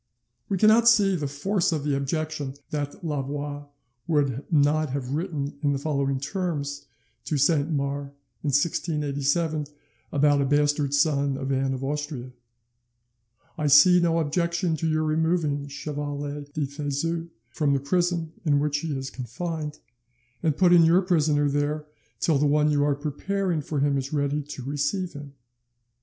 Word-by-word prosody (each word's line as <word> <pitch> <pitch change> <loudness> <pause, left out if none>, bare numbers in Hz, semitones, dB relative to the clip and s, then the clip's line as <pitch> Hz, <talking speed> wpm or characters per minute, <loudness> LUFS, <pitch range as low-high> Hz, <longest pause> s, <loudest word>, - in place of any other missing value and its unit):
We 195 - +1
cannot 220 +4 +6
see 200 -5 +4
the 150 -4 -2
force 170 +7 0
of 155 -3 -1
the 145 -1 0
objection 145 0 -3 0.2
that 145 0 -4
Louvois 145 0 -3 0.4
would 145 -4 0
not 155 0 +3
have 130 -1 -4
written 145 -3 -3
in 145 -1 +2
the - - 0
following 140 -2 -1
terms 145 -3 -3 0.4
to 150 - -1
Saint 145 +2 +2
Mars 140 -1 -2 0.3
in - - -3
1687 150 +1 0 0.4
about 145 0 +3
a - - +2
bastard 145 0 +2
son 140 -2 +2
of 135 0 -3
Anne 135 0 0
of 130 - -6
Austria: 145 -3 -4 1.3
"I 150 - +1
see 145 +6 +7
no 170 -1 +2
objection 170 +2 0
to 165 - -1
your 155 0 +1
removing 155 -2 0
Chevalier 145 0 -5
de 150 -1 -1
Thezut 150 +4 -3 0.2
from 140 +2 +1
the 140 - +2
prison 170 +2 0
in 150 -4 +3
which 145 0 0
he 150 -3 -3
is 135 0 -5
confined, 150 +5 -5 0.6
and 155 -4 0
putting 175 -2 +6
your 170 +4 +5
prisoner 155 -5 +2
there 145 +2 -1 0.3
till 155 -4 +2
the 150 - +3
one 150 +1 +3
you 145 -1 +2
are 145 -1 +2
preparing 165 +4 -2
for 145 0 -3
him 140 -1 +2
is 135 +1 -5
ready 145 0 0
to 145 -2 -8
receive 145 +7 -2
him." 145 -1 -9
145 Hz, 155 wpm, -25 LUFS, 140-160 Hz, 1.3 s, see